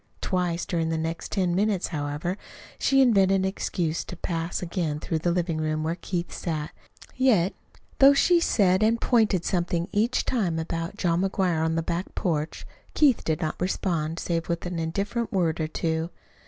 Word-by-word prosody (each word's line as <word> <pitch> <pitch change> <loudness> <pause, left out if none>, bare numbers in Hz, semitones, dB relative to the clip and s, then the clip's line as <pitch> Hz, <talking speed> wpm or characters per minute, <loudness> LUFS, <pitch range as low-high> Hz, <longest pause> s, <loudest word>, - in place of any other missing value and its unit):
Twice 180 -2 -1
during 165 -2 -1
the 165 - 0
next 160 +1 -4
ten 185 -4 +1
minutes, 195 0 +1
however, 150 +3 -2 0.4
she 270 -1 +4
invented 195 -6 +4
an 190 0 +1
excuse 175 -4 -1
to 180 - -8
pass 165 -1 -2
again 165 -4 -2
through 160 +1 -2
the 175 - 0
living 170 -2 0
room, 155 0 -1
where 160 +1 0
Keith 175 0 -4
sat. 155 -3 -3 0.4
Yet, 220 -9 +3 0.5
though 275 +1 +8
she 345 +5 +4
said 190 - +3
a 215 +1 +5
pointed 220 -6 +2
something 175 -1 0
each 225 +4 +1
time 190 -10 0
about 165 +4 -3
John 175 -2 +1
McGuire 185 -4 +1
on 160 0 0
the 165 - 0
back 170 +3 -3
porch, 160 -3 -2 0.3
Keith 280 -6 +4
did 160 +2 -1
not 155 0 -3
respond 170 -3 -1
save 170 0 -2
with 170 0 -2
an 175 -1 -3
indifferent 200 +8 -2
word 170 -5 +1
or 155 - 0
two. 160 +1 -2
175 Hz, 175 wpm, -26 LUFS, 165-195 Hz, 0.5 s, though